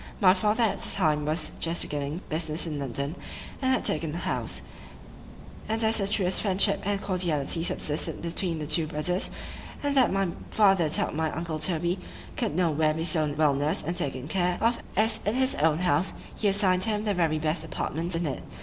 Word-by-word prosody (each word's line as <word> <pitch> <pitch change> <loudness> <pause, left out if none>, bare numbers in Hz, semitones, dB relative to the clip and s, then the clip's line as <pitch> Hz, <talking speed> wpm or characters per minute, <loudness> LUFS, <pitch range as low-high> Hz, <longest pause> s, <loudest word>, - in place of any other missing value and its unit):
My 185 -3 +6
father 210 +4 +1
at 220 - +1
that - - +2
time 150 -5 +1
was 155 +1 -2
just 165 +1 -2
beginning 145 +3 -4
business 160 +1 -1
in 150 -3 -4
London, 140 +2 -3 0.5
and 260 -1 +2
had 260 - +1
taken 155 0 0
a - - -2
house;—and 220 +4 -6
as 220 0 +4
the 195 - 0
truest 190 -3 +1
friendship 195 -2 +2
and 205 -1 0
cordiality 170 -5 0
subsisted 150 -3 0
between 170 0 -2
the 155 - -4
two 155 +1 0
brothers,—and 180 - -3
that 260 -3 +5
my 195 -1 +1 0.2
father 195 -6 +4
thought - - +1
my 160 +1 0
uncle 160 0 -4
Toby 175 +3 0 0.4
could 150 - -1
no 175 -2 +2
where 155 0 +2
be 160 - -2
so 155 -3 +2
well 150 -2 +4
nursed 145 +6 0
and 170 +3 -2
taken 140 -6 -3
care 180 +1 +1
of 235 +1 +2 0.2
as 220 +2 +3
in 210 +3 0
his 260 +1 +2
own 155 +1 +2
house,——he 180 +4 -1
assign'd 190 -2 +3
him 210 -1 -1
the 210 -1 0
very 165 -4 +1
best 155 +1 -1
apartment 165 +2 -2
in 165 +1 -1
it. 140 - -3
170 Hz, 185 wpm, -27 LUFS, 155-195 Hz, 0.5 s, My